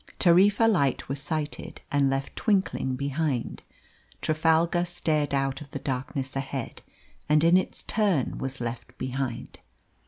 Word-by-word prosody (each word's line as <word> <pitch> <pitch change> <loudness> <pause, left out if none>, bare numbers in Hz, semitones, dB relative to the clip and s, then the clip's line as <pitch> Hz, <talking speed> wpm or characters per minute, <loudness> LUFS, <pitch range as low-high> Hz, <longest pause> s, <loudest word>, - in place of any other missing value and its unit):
Tarifa 195 +5 +5
light 145 - +1
was 135 +1 -2
sighted 155 +1 -4
and 140 -1 +3
left 135 0 -2
twinkling 190 - +1
behind. 140 -1 -2 0.6
Trafalgar 165 +2 +2
stared 160 -4 0
out 135 0 0
of 145 - -10
the 140 - -5
darkness 135 0 -3
ahead, 135 -2 -4 0.5
and 150 +1 +4
in 170 +2 +6
its 185 - 0
turn 200 - 0
was 135 0 -4
left 120 +1 -6
behind. 130 -1 -4
145 Hz, 130 wpm, -27 LUFS, 135-170 Hz, 0.6 s, in